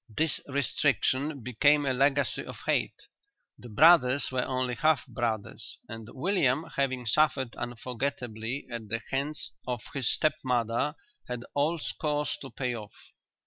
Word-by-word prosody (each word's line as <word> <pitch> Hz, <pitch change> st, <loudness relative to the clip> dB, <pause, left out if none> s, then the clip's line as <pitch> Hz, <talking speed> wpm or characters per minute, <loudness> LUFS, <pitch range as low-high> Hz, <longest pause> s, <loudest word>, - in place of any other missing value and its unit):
This 160 Hz, -2 st, +2 dB
restriction 140 Hz, 0 st, +1 dB
became 145 Hz, +5 st, +3 dB
a 135 Hz, -, +2 dB
legacy 140 Hz, +2 st, +2 dB
of -, -, -8 dB
hate. -, -, 0 dB, 0.5 s
The 120 Hz, -, -11 dB
brothers 140 Hz, +1 st, +5 dB
were 130 Hz, -1 st, +1 dB
only 130 Hz, -1 st, -1 dB
half 155 Hz, -1 st, +2 dB
brothers 110 Hz, -4 st, -3 dB
and 115 Hz, -1 st, -7 dB
William 150 Hz, -2 st, +1 dB
having 130 Hz, -3 st, 0 dB
suffered 130 Hz, 0 st, +2 dB
unforgettably 120 Hz, 0 st, -4 dB
at 115 Hz, -2 st, -5 dB
the 115 Hz, +1 st, -1 dB
hands 140 Hz, +3 st, -2 dB, 0.2 s
of 125 Hz, -3 st, -2 dB
his 135 Hz, -4 st, +1 dB
step 155 Hz, -, +2 dB
mother 125 Hz, +3 st, 0 dB, 0.3 s
had 125 Hz, -1 st, -5 dB
old 150 Hz, +3 st, +1 dB
scores 150 Hz, -5 st, -1 dB
to 135 Hz, -, -7 dB
pay 125 Hz, 0 st, -2 dB
off. 105 Hz, -2 st, -11 dB
130 Hz, 140 wpm, -29 LUFS, 120-145 Hz, 0.5 s, brothers